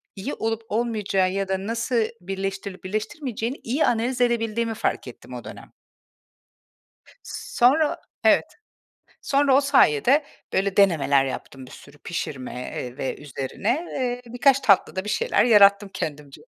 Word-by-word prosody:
iyi 210 +8 -5
olup 225 0 -2
olmayacağı 210 -4 0
ya 195 0 -2
da 190 +1 -2
nasıl 235 +1 0 0.2
birleştirilip 195 +1 -5
birleştirilmeyeceğini 230 - -4
iyi 265 +7 +1
analiz 245 +2 0
edebildiğimi 230 -1 0
fark 220 - -2
ettim - - -11
o - - -7
dönem. - - -11 1.5
S - - -8
sonra 290 +5 +4
o, - - -8 0.3
evet, - - +5 0.8
sonra 275 -1 +3
o 275 - +5
sayede 275 - +4 0.3
böyle 195 +1 0
denemeler 145 -8 +4
yaptım 135 0 -7
bir - - -15
sürü 140 +1 -14
pişirme, 145 -4 -5
eee, 125 0 -6
ve 135 - -3
üzerine. 135 -2 -4 0.2
Eee, 245 -2 -2
birkaç 270 +2 +4
tatlıda 195 -5 +2
bir 210 - -5
şeyler 470 - +2
yarattım 200 -3 +6
kendimce. 145 -2 -6
210 Hz, 140 wpm, -24 LUFS, 185-245 Hz, 1.5 s, yarattım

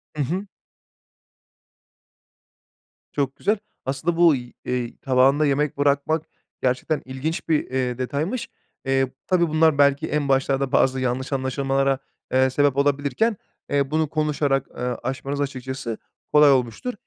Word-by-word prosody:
Hı 150 - 0
hı. 180 +9 -2 2.7
Çok 140 -2 -1
güzel. 210 +2 +1 0.3
Aslında 140 +6 -1
bu 170 -3 +6
y 120 -1 -8
eee, 125 -2 -3
tabağında 135 +3 +3
yemek 145 0 0
bırakmak 145 +2 +1 0.4
gerçekten 130 +4 0
ilginç 145 +7 -4
bir, 155 -2 +3
eee, 125 -2 -1
detaymış. 150 - -2 0.4
Eee, 135 -1 +1 0.2
tabii 175 -2 +3
bunlar 155 -1 +3
belki 140 -1 +3
en 145 -2 -1
başlarda 135 0 +1
bazı 130 0 +3
yanlış 130 +2 -2
anlaşılmalara, 135 0 0 0.3
eee, 130 0 +4
sebep 140 0 +2
olabilirken, 145 - +1 0.3
eee, 140 -1 +1
bunu 155 -1 +1
konuşarak, 145 -3 0
ııı, 125 -1 -3
aşmanız 135 +3 -3
açıkçası 130 -3 -4 0.4
kolay 150 -1 +7
olmuştur. 130 - 0
140 Hz, 125 wpm, -23 LUFS, 130-150 Hz, 2.7 s, kolay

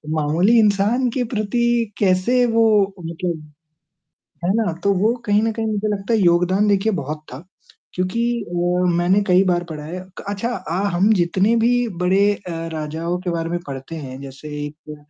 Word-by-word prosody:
मामूली 165 +10 +3
इंसान 215 +4 +2
के 245 +1 -1
प्रति 235 +1 0
कैसे 205 +6 +3
वो 220 -4 +3
मतलब 165 -3 -4 0.9
है 190 - +2
ना? 220 -6 +1
तो 200 - +3
वो 210 +5 +2
कहीं 205 0 +3
न 225 - +1
कहीं 225 0 -3
मुझे 215 0 -1
लगता 205 +2 -2
है 225 - +3
योगदान 180 +3 +3
देखिए 205 +2 +2
बहुत 150 +3 -6
था। 135 +7 -9 0.5
क्योंकि 185 +5 -1 0.3
वो 175 +1 +1
मैंने 175 +4 +3
कई 180 +1 +5
बार 175 -1 +1
पढ़ा 150 -1 -6
है 175 +4 -6 0.2
क - - -8
अच्छा 205 +4 -2
अ, 185 -3 -7 0.2
हम 190 +5 +3
जितने 190 +4 +2
भी 245 +1 +2
बड़े 195 +3 +3
अ, 175 - -4 0.2
राजाओं 160 +3 -3
के 185 - -3
बारे 165 -1 -2
में 175 - -2
पढ़ते 135 +4 -7
हैं, 135 -4 -7
जैसे 140 +2 -9 0.2
एक 150 +1 -10
185 Hz, 175 wpm, -20 LUFS, 170-215 Hz, 0.9 s, कई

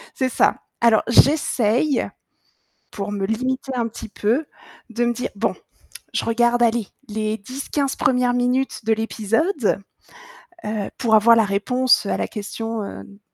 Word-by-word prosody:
C'est 260 -1 0
ça. - - +2 0.2
Alors 230 -2 +4
j'essaye, 260 0 +3 0.8
pour 200 0 -5
me 200 -1 -2
limiter 255 +5 -2
un 235 -2 -1
petit 220 -1 -9
peu, 230 +10 0 0.5
de 235 +1 0
me 240 - +2
dire: 245 - -4
«Bon, 200 - -1 0.6
je - - -1
regarde, 240 +1 +2
allez, 230 -3 +1 0.2
les 215 0 -2
10-15 270 +5 -3
premières 250 -1 +2
minutes 250 +1 0
de 225 - +1
l'épisode, 225 - 0 0.8
heu, 210 -2 -3
pour 225 -3 +3
avoir 230 +2 +6
la 225 - +4
réponse 235 +5 +2
à - - 0
la - - -2
question, 225 +1 -5
heu, 200 - -7
de 200 0 -16
230 Hz, 150 wpm, -21 LUFS, 215-250 Hz, 0.8 s, avoir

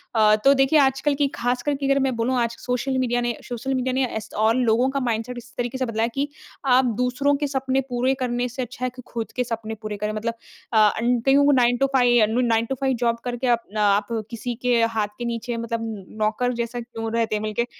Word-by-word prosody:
अ, 215 -1 +5
तो 275 - +8
देखिए 270 +3 +4
आजकल 270 +2 +2
की 285 0 +2
खास 245 +1 -1
कर 290 - 0
के 275 0 -4
अगर 275 0 +3
मैं 265 -2 0
बोलूँ 245 +3 0
आज 235 0 -1
सोशल 250 +2 -1
मीडिया 245 -2 0
ने 240 0 0
सोशल 250 +2 -4
मीडिया 255 0 0
ने 265 +1 +1
ऐस 220 0 -5
और 220 +2 +3
लोगों 245 +1 +2
का 275 - -1
माइंडसेट 240 -1 -2
इस 240 0 -11
तरीके 245 +1 -2
से 260 - 0
बदला 225 -1 -1
है 230 - +1
कि 280 +1 -1 0.4
आप 255 0 +5
दूसरों 250 +3 +1
के 290 0 -1
सपने 265 -1 0
पूरे 250 +2 +1
करने 245 -1 -1
से 250 +2 -5
अच्छा 250 +1 -6
है - - 0
कि 250 - -9
खुद 230 -1 -5
के 250 - +1
सपने 225 -2 -4
पूरे 215 -1 -5
करें 210 +1 -2
मतलब 230 +2 -2 0.4
अ, - - +3
अन्न 230 +3 +3
कईयों 275 +1 +5
को 290 - +5
nine 245 -2 +3
to 275 - +3
five 245 -3 +5
Anu 225 +4 +1
nine 225 0 +2
to 270 - -3
five 265 -1 +2
job 235 -1 +1
करके 245 +1 -3
अपना 230 -3 0
आप 205 0 -1 0.2
किसी 240 +1 -4
के 250 -1 +2 0.2
हाथ 210 -1 +1
के 240 - -4
नीचे 235 0 -3
मतलब 230 0 -3 0.4
नौकर 220 +4 +1
जैसा 235 +1 -2
क्यों 225 -1 -6
रहते 225 -2 +1
हैं 210 - -2
मिलके। 215 +2 -1
245 Hz, 245 wpm, -23 LUFS, 230-260 Hz, 0.4 s, तो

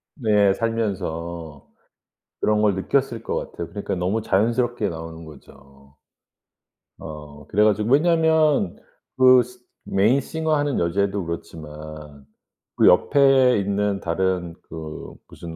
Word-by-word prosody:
네. 105 -7 +3
살면서 85 - -4 0.7
그런 105 0 +1
걸 105 -3 +2
느꼈을 120 +4 -1
것 - - -3
같아요. 85 - -5
그러니까 100 +2 -4
너무 95 +5 -1
자연스럽게 115 +1 0
나오는 80 0 -8
거죠. 70 -1 -17 1.0
어 75 -1 -10
그래 105 +2 +2
가지고 105 +2 +1
왜냐면 155 - +3 0.4
그 130 -1 +7
시 125 +1 -15 0.3
메인 110 +8 +2
싱어 160 +2 -1
하는 145 -2 0
여자애도 95 +2 -1
그렇지만 75 -3 -9 0.5
그 - - +4
옆에 135 -3 +5
있는 100 0 -1
다른 90 0 -1
그 80 -1 -9
무슨 85 -1 -10
100 Hz, 250 characters per minute, -22 LUFS, 80-120 Hz, 1.0 s, 그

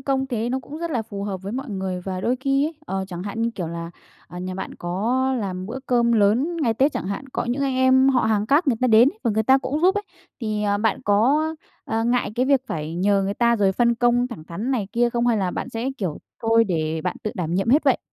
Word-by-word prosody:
công 270 0 0
thế 235 -2 -2
nó 260 - 0
cũng 295 +4 -9
rất 335 0 -3
là 240 -6 -1
phù 200 -2 -7
hợp 190 -2 -4
với 200 +3 -5
mọi 265 -1 -4
người 190 -2 -3
và 185 -1 -3
đôi 245 +6 0
khi 275 +2 +2
ấy, 325 - -6
ờ, 190 -4 -2
chẳng 175 -1 -6
hạn, 205 +3 -4
như 230 - +1
kiểu 175 -4 -3
là, 170 0 -6 0.4
à, 175 - -8
nhà 185 +1 -4
bạn 190 - -6
có 205 +9 -1 0.2
làm 185 -2 -4
bữa 250 +4 -5
cơm 235 -1 +3
lớn 230 +11 +2
ngày 235 -8 +1
Tết 275 +5 +2
chẳng - - -4
hạn, 200 +7 -4
có - - -1
những 250 +4 -1
anh 270 -2 0
em 260 +1 +4
họ 255 -2 +3
hàng 215 -1 +1
khác 290 +7 +3
người 235 - +2
ta 255 - +3
đến 230 +2 +6
ấy, - - -25
và 230 - +2
người 220 +1 +1
ta 265 +4 +5
cũng 280 +3 -3
giúp 375 +3 +4
ấy, 410 - -1 0.4
thì, 215 -2 -2
ờ, 205 0 +1
bạn 220 -1 0
có, 235 +10 +3 0.4
ờ, 225 0 -1
ngại 240 -2 +1
cái 255 +2 +1
việc 275 -2 +4
phải 155 +1 -4
nhờ 195 +2 +2
người 195 +1 -2
ta 235 -1 +3
rồi 195 -2 +2
phân 235 +3 +2
công 240 +1 +2
thẳng 160 -11 -9
thắn 205 +11 -4
này 230 -7 0
kia 240 0 +2
không? 240 0 0
Hay 235 - +3
là 190 -3 0
bạn - - -4
sẽ, 240 +1 -3
kiểu, 180 -7 -3 0.2
thôi 225 0 +4
để 160 -4 -1
bạn 180 - -2
tự 215 - -2
đảm 170 -2 -2
nhiệm 195 +4 0
hết 290 +5 +4
vậy? - - +4
225 Hz, 275 wpm, -23 LUFS, 195-260 Hz, 0.4 s, đến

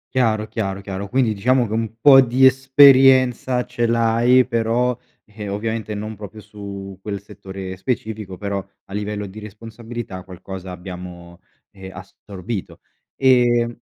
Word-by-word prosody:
Chiaro, 110 -4 +1
chiaro, 100 -3 -4
chiaro, 100 0 -6
quindi 125 -3 +1
diciamo 125 +5 +2
che 110 - -5
un 115 0 -2
po' 135 +1 +8
di 130 +1 +3
esperienza 130 -1 +5
ce 120 0 -2
l'hai, 115 +2 +3
però, 120 +1 0 0.3
ehm, 105 -1 -8
ovviamente 110 +1 -3
non 110 +1 -6
proprio 105 +1 -10
su 100 -2 -9
quel 100 0 -5
settore 95 -1 -9
specifico. 105 -3 -4
Però, 100 -1 -3 0.2
a 95 - -13
livello 105 0 -4
di 100 +2 -10
responsabilità 110 -1 -8
qualcosa 95 +1 -9
abbiamo, 90 -1 -10 0.3
ehm, 95 -1 -11
assorbito. 95 +2 -8 0.3
E 120 -3 +3
110 Hz, 135 wpm, -20 LUFS, 100-120 Hz, 0.3 s, po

